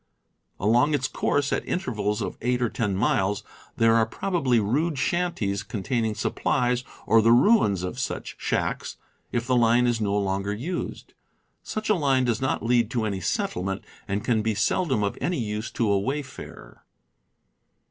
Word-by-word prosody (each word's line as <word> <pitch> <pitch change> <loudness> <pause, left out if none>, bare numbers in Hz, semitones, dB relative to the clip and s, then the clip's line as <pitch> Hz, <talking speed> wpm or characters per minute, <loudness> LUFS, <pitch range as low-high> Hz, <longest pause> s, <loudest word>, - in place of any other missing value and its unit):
Along 120 +9 +3
its 130 -2 0
coursie, 145 +1 0
at - - -6
intervals 105 - -1
of - - -4
eight 125 +1 +1
or 120 -2 +1
ten 105 -4 -1
miles, 95 0 +1 0.3
there 115 0 +4
are 115 -1 +4
probably 135 -4 +1
rude 140 +10 0
shanties 140 - 0
containing 110 +2 -2
supplies, 125 +3 0 0.2
or 115 0 +5
the 115 +1 +4
ruins 120 - +4
of 90 - -4
such - - -3
shacks, - - -2 0.3
if 120 -1 -1
the 130 - +2
line 120 +1 +4
is 120 -2 +1
no 100 -1 +1
longer 100 0 -1
used. 165 - -5 0.5
Such 215 0 -4
a 215 - +4
line 140 -7 +2
does 120 0 0
not 130 -3 -1
lead 120 -2 +3
to 115 -2 -1
any 100 -3 -2
settlement, 95 +2 -2 0.2
and 100 +1 -2
can 110 -4 +2
seldom 130 - +1
be - - +2
of 100 - -3
any 180 - 0
use 105 -1 -3
to 115 - 0
a 100 - +3
wayfarer. 135 +5 -6
115 Hz, 165 wpm, -25 LUFS, 105-130 Hz, 0.5 s, or